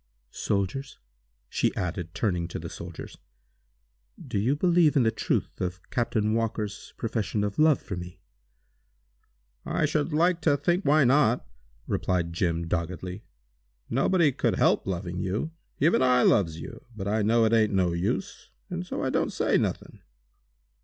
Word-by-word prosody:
"Soldiers," 105 Hz, +8 st, -2 dB, 0.5 s
she -, -, 0 dB
added, 90 Hz, -2 st, -4 dB
turning 90 Hz, -6 st, 0 dB
to -, -, -6 dB
the -, -, -7 dB
soldiers, -, -, -9 dB, 1.0 s
"do 100 Hz, -, -3 dB
you 125 Hz, +8 st, +2 dB
believe 170 Hz, -1 st, +3 dB
in 135 Hz, -, +4 dB
the 110 Hz, -, +3 dB
truth 110 Hz, -, -2 dB
of 90 Hz, 0 st, -2 dB
Captain 110 Hz, -3 st, 0 dB
Walker's 110 Hz, -2 st, -2 dB
profession 110 Hz, -2 st, -1 dB
of 100 Hz, +4 st, -3 dB
love 155 Hz, -3 st, +5 dB
for 95 Hz, -, -6 dB
me?" 90 Hz, 0 st, -8 dB, 1.4 s
"I -, -, 0 dB
should 150 Hz, +2 st, 0 dB
like 170 Hz, +3 st, +2 dB
to 145 Hz, -4 st, +2 dB
know 175 Hz, 0 st, +4 dB
why 155 Hz, -4 st, +4 dB
not!" 125 Hz, -, +3 dB, 0.4 s
replied 85 Hz, -2 st, -1 dB
Jim, 85 Hz, -1 st, -1 dB
doggedly. 90 Hz, +2 st, -4 dB, 0.7 s
"Nobody 150 Hz, +5 st, +3 dB
could -, -, 0 dB
help -, -, +2 dB
loving 90 Hz, -1 st, -3 dB
you; 100 Hz, -, -2 dB, 0.3 s
even 160 Hz, +1 st, +3 dB
I 125 Hz, -1 st, +4 dB
loves 85 Hz, -6 st, +3 dB
you, -, -, -9 dB
but 100 Hz, -2 st, -5 dB
I 110 Hz, +2 st, +1 dB
know 115 Hz, +2 st, +3 dB
it 110 Hz, -, +2 dB
ain't 110 Hz, -2 st, +4 dB
no 95 Hz, -3 st, +2 dB
use, 115 Hz, -, -3 dB, 0.2 s
and 180 Hz, 0 st, -3 dB
so 180 Hz, -, -4 dB
I 130 Hz, -, 0 dB
don't -, -, 0 dB
say -, -, +1 dB
nothing!" -, -, -2 dB
110 Hz, 155 wpm, -27 LUFS, 90-140 Hz, 1.4 s, love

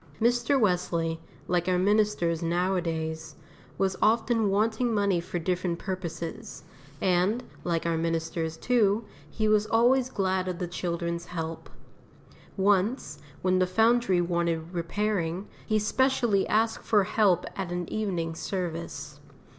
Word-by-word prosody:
Mr. 240 Hz, +3 st, +2 dB
Wesley, 175 Hz, -5 st, 0 dB, 0.3 s
like 175 Hz, 0 st, 0 dB
our 180 Hz, -1 st, +2 dB
ministers 200 Hz, -4 st, +2 dB
nowadays, 165 Hz, -3 st, -1 dB, 0.4 s
was 190 Hz, 0 st, +1 dB
often 225 Hz, -1 st, +3 dB
wanting 220 Hz, +4 st, +1 dB
money 200 Hz, -4 st, +2 dB
for 175 Hz, -, -5 dB
different 175 Hz, 0 st, -1 dB
purposes, 170 Hz, -3 st, -6 dB, 0.4 s
and, 190 Hz, +7 st, +2 dB, 0.2 s
like 170 Hz, -2 st, -1 dB
our 165 Hz, -1 st, 0 dB
ministers 165 Hz, 0 st, -2 dB
too, 220 Hz, 0 st, +2 dB, 0.2 s
he 215 Hz, +6 st, -1 dB
was 215 Hz, 0 st, +3 dB
always 245 Hz, +3 st, +3 dB
glad 190 Hz, -4 st, 0 dB
of 180 Hz, -1 st, -3 dB
the 180 Hz, -, -2 dB
children's 170 Hz, -1 st, -3 dB
help. 165 Hz, -2 st, -5 dB, 0.9 s
Once, 195 Hz, -, +1 dB, 0.2 s
when 185 Hz, 0 st, +3 dB
the 185 Hz, -, +3 dB
Foundry 225 Hz, -1 st, +3 dB
wanted 170 Hz, -1 st, -1 dB
repairing, 180 Hz, +1 st, -1 dB, 0.2 s
he 215 Hz, -, +2 dB
specially 230 Hz, -1 st, +2 dB
asked 225 Hz, +1 st, +1 dB
for 210 Hz, -3 st, +3 dB
help 190 Hz, -3 st, +2 dB
at 190 Hz, -3 st, -4 dB
an 175 Hz, -1 st, -3 dB
evening 180 Hz, -7 st, -1 dB
service. 165 Hz, -5 st, -5 dB
185 Hz, 125 wpm, -27 LUFS, 170-215 Hz, 0.9 s, often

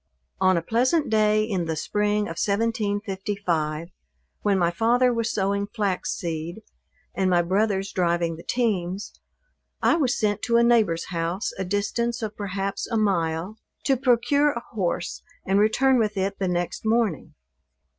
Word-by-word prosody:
On 185 Hz, -1 st, +4 dB
a 165 Hz, -, -1 dB
pleasant 255 Hz, -, +1 dB
day 215 Hz, 0 st, +3 dB
in 195 Hz, -6 st, -1 dB
the 160 Hz, -1 st, -2 dB
spring 210 Hz, +6 st, 0 dB
of 165 Hz, -5 st, -3 dB
1755, 200 Hz, -7 st, -1 dB, 0.5 s
when 200 Hz, -2 st, +2 dB
my 170 Hz, -2 st, +2 dB
father 240 Hz, +6 st, +3 dB
was 230 Hz, -1 st, -1 dB
sowing 200 Hz, 0 st, 0 dB
flax 205 Hz, -4 st, -2 dB
seed, 170 Hz, +4 st, -5 dB, 0.5 s
and 190 Hz, -1 st, +1 dB
my 175 Hz, -1 st, +3 dB
brothers 195 Hz, +2 st, 0 dB
driving 170 Hz, -2 st, 0 dB
the 165 Hz, -, -10 dB
teams, 200 Hz, -5 st, -1 dB, 0.7 s
I -, -, +3 dB
was 270 Hz, -5 st, +1 dB
sent 205 Hz, -2 st, 0 dB
to 235 Hz, -1 st, +3 dB
a 235 Hz, -, +5 dB
neighbor's 220 Hz, -8 st, +2 dB
house, 170 Hz, +2 st, -2 dB
a -, -, 0 dB
distance 225 Hz, +5 st, -1 dB
of 215 Hz, -1 st, -4 dB
perhaps 200 Hz, -1 st, -3 dB
a 230 Hz, -, -1 dB
mile, 185 Hz, -1 st, 0 dB, 0.2 s
to 270 Hz, -, +3 dB
procure 265 Hz, +4 st, +3 dB
a 235 Hz, -, -5 dB
horse 180 Hz, -5 st, -2 dB, 0.2 s
and 195 Hz, +1 st, +2 dB
return 250 Hz, +5 st, +3 dB
with 215 Hz, -2 st, 0 dB
it 195 Hz, +1 st, -1 dB
the 190 Hz, -, 0 dB
next 175 Hz, -1 st, -2 dB
morning. 220 Hz, -, 0 dB
205 Hz, 155 wpm, -25 LUFS, 180-225 Hz, 0.7 s, a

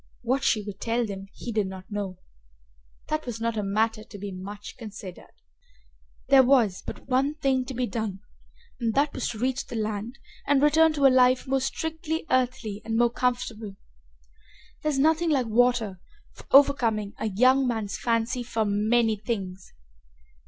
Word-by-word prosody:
What 260 Hz, +3 st, 0 dB
she 215 Hz, -3 st, +2 dB
would 200 Hz, -1 st, -8 dB
tell 235 Hz, +1 st, 0 dB
them 195 Hz, -2 st, -7 dB
he 240 Hz, -, -7 dB
did 210 Hz, -3 st, 0 dB
not 190 Hz, +1 st, -10 dB
know. 200 Hz, -3 st, -4 dB, 0.9 s
That 310 Hz, -3 st, -2 dB
was 230 Hz, -2 st, -4 dB
not 230 Hz, 0 st, -1 dB
a 215 Hz, -, -1 dB
matter 215 Hz, +2 st, 0 dB
to 215 Hz, -, -11 dB
be 200 Hz, 0 st, -6 dB
much 200 Hz, +3 st, -8 dB
considered. 210 Hz, -5 st, -10 dB, 1.0 s
There 270 Hz, -1 st, +8 dB
was 245 Hz, -8 st, +3 dB
but -, -, -8 dB
one 270 Hz, +3 st, +1 dB
thing 265 Hz, -4 st, 0 dB
to 260 Hz, 0 st, -7 dB
be 250 Hz, +1 st, 0 dB
done 220 Hz, -5 st, -4 dB, 0.6 s
and 230 Hz, -3 st, -1 dB
that 285 Hz, +1 st, +2 dB
was 260 Hz, -, -2 dB
to 220 Hz, -, -6 dB
reach 260 Hz, +3 st, -1 dB
the -, -, -7 dB
land 220 Hz, +3 st, -3 dB, 0.3 s
and 285 Hz, -1 st, +4 dB
return 320 Hz, +2 st, +5 dB
to 285 Hz, -2 st, +1 dB
a 265 Hz, -, +7 dB
life 255 Hz, 0 st, +4 dB
more 270 Hz, 0 st, 0 dB
strictly 320 Hz, +3 st, -3 dB
earthly 250 Hz, -5 st, 0 dB
and 225 Hz, 0 st, -2 dB
more 240 Hz, 0 st, +3 dB
comfortable. 235 Hz, -5 st, -2 dB, 1.1 s
There 305 Hz, -, 0 dB
is 290 Hz, -, -1 dB
nothing 320 Hz, +4 st, +3 dB
like 270 Hz, -5 st, +2 dB
water 230 Hz, -4 st, +2 dB, 0.3 s
for -, -, -15 dB
overcoming 235 Hz, -7 st, +4 dB
a -, -, -1 dB
young 255 Hz, +6 st, +4 dB
man's 220 Hz, -4 st, -2 dB
fancy 235 Hz, +1 st, 0 dB
for 230 Hz, -2 st, -1 dB
many 215 Hz, +2 st, +2 dB
things. 195 Hz, -4 st, -5 dB
235 Hz, 170 wpm, -26 LUFS, 210-260 Hz, 1.1 s, There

